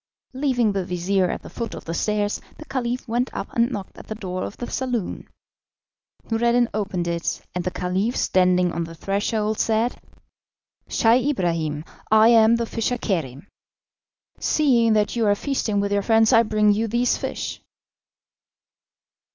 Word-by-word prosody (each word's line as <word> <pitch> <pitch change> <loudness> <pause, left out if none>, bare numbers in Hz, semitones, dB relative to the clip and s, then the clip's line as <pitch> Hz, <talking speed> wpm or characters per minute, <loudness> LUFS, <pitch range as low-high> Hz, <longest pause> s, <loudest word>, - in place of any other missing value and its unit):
Leaving 255 -5 +1
the 195 -1 -1
vizir 180 +1 0
at - - -4
the - - -9
foot 235 -2 -5
of - - -9
the 165 - -4
stairs, 210 +2 -1 0.2
the 310 - -10
Caliph 250 -2 -3
went 240 +3 0
up - - -6
and 235 +1 +2
knocked 200 -7 -7
at - - -12
the 215 - -5
door 185 -3 -5
of - - -6
the 240 - -4
saloon. 245 -6 -3 1.0
Noureddin 235 +1 +3
opened 195 -4 -2
it, 170 0 -2
and 180 - -2
the 185 - -1
Caliph, 185 +6 -1
standing 180 -1 +3
on 170 0 -2
the 165 0 -10
threshold, 210 +4 -1
said: 225 +2 0 0.9
"Scheih 245 +4 +3
Ibrahim, 165 - -1 0.2
I 220 +1 +6
am 225 -1 +6
the 235 0 -1
fisher 230 +2 -2
Kerim. 160 - -3 0.9
Seeing 240 -7 +3
that 210 +1 +1
you 230 -2 +1
are 205 - +4
feasting 220 -4 -1
with 200 0 -1
your 200 - +2
friends, 225 +1 +4
I 225 - +7
bring 215 -2 +2
you 220 +2 0
these 240 +3 +1
fish." - - -4
215 Hz, 160 wpm, -23 LUFS, 185-235 Hz, 1.0 s, I